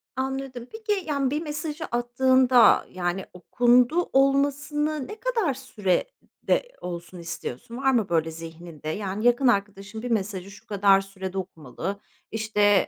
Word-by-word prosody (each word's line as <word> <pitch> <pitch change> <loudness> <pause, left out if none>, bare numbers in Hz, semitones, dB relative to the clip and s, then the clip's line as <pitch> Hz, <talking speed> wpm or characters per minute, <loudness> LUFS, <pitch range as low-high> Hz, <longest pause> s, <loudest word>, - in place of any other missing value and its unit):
Anladım. 265 -2 -4
Peki, 425 -4 -2
yani, 280 -3 +1
bir 300 +2 -1
mesajı 300 0 -4
attığında, 250 +1 +4
yani, 180 +1 -2
okundu 245 - +3
olmasını 285 +2 +1
ne 425 - -7
kadar 450 - 0
sürede 260 - -1 0.2
olsun 175 0 -7
istiyorsun? 170 - -6
Var 270 0 +2
mı 225 -7 +1
böyle 165 -1 +1
zihninde? 165 -1 -8
Yani, 200 +5 -3
yakın 245 +2 +4
arkadaşın 200 -1 -1
bir 245 0 -4
mesajı 200 -3 -2
şu 205 - -15
kadar 200 -1 +4
sürede 195 -1 -7
okumalı, 185 +1 -5 0.3
işte, 210 -2 +3
230 Hz, 130 wpm, -25 LUFS, 190-270 Hz, 0.3 s, attığında